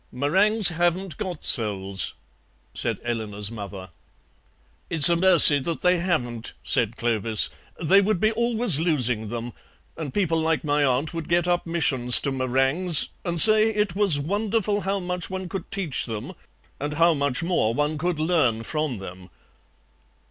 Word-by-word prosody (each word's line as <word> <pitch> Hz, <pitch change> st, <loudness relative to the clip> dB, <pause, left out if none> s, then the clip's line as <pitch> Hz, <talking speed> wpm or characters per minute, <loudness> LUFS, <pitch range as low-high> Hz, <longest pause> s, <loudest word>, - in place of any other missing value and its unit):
"Meringues 190 Hz, -, +2 dB
haven't 175 Hz, +1 st, -2 dB
got 185 Hz, -7 st, -6 dB
souls," 100 Hz, -, 0 dB, 0.6 s
said -, -, -3 dB
Eleanor's 105 Hz, -3 st, -4 dB
mother. 100 Hz, -4 st, -9 dB, 1.0 s
"It's 165 Hz, 0 st, +7 dB
a 170 Hz, -, +2 dB
mercy 170 Hz, -5 st, +7 dB
that 165 Hz, +4 st, -5 dB
they 180 Hz, 0 st, +2 dB
haven't," 125 Hz, -11 st, -4 dB
said 120 Hz, -2 st, 0 dB
Clovis; 115 Hz, -2 st, +1 dB, 0.3 s
"they 185 Hz, +4 st, +3 dB
would 200 Hz, -2 st, -1 dB
be 215 Hz, +3 st, +1 dB
always 230 Hz, -, +3 dB
losing 125 Hz, -10 st, 0 dB
them, 120 Hz, +2 st, -7 dB, 0.4 s
and 155 Hz, -4 st, -7 dB
people 165 Hz, -3 st, -1 dB
like 160 Hz, -1 st, -1 dB
my 145 Hz, -1 st, 0 dB
aunt 135 Hz, +4 st, -1 dB
would 165 Hz, -1 st, -7 dB
get 175 Hz, 0 st, 0 dB
up 175 Hz, -1 st, -1 dB
missions 130 Hz, -7 st, +2 dB
to 140 Hz, -, -3 dB
meringues, 135 Hz, +6 st, +1 dB
and 170 Hz, -2 st, -2 dB
say 215 Hz, +3 st, +7 dB
it 210 Hz, -4 st, -2 dB
was 195 Hz, -8 st, +2 dB
wonderful 205 Hz, +5 st, -2 dB
how 195 Hz, +1 st, -3 dB
much 180 Hz, -1 st, -5 dB
one 190 Hz, -1 st, -6 dB
could 190 Hz, +2 st, -8 dB
teach 185 Hz, -11 st, -3 dB
them 110 Hz, -2 st, -7 dB, 0.5 s
and 145 Hz, +1 st, -5 dB
how 170 Hz, +2 st, +3 dB
much 140 Hz, 0 st, -2 dB
more 165 Hz, -10 st, -1 dB
one 150 Hz, +2 st, -2 dB
could 175 Hz, -1 st, -3 dB
learn 155 Hz, -9 st, 0 dB
from 150 Hz, -1 st, -4 dB
them." 95 Hz, -1 st, -11 dB
160 Hz, 155 wpm, -23 LUFS, 125-180 Hz, 1.0 s, It's